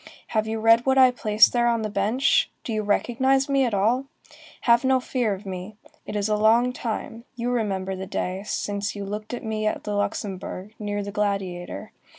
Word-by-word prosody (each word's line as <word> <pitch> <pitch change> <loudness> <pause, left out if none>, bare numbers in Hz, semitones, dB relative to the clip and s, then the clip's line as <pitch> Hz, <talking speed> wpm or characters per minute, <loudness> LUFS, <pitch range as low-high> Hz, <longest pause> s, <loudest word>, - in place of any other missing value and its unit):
Have 215 -1 0
you 220 0 -2
read 230 +3 +4
what 265 0 +3
I 260 -1 +7
placed 215 -3 +4
there 240 -1 +2
on 230 -2 +1
the - - -1
bench? 210 +6 +2
Do 230 - -4
you 215 - 0
recognize 260 +6 +1
me 275 -1 +2
at 235 - -2
all? 230 +7 +2 0.6
Have 235 +1 +4
no 260 0 +3
fear 245 -5 -1
of 195 +2 -13
me. 190 +2 -6 0.3
It - - -5
is 205 0 0
a 215 - +1
long 230 +4 +3
time, 230 -1 -5
you 240 +1 -2
remember 195 -5 -1
the 190 0 -6
day, 185 +1 -3
since 205 0 -3
you 200 -1 -5
looked 210 +2 -5
at 245 - -5
me 215 -1 -2
at - - -2
the 210 - -3
Luxembourg, 200 -1 -3
near 205 -1 -3
the 200 - -6
Gladiator. 195 -1 -3
215 Hz, 200 wpm, -24 LUFS, 200-240 Hz, 0.6 s, I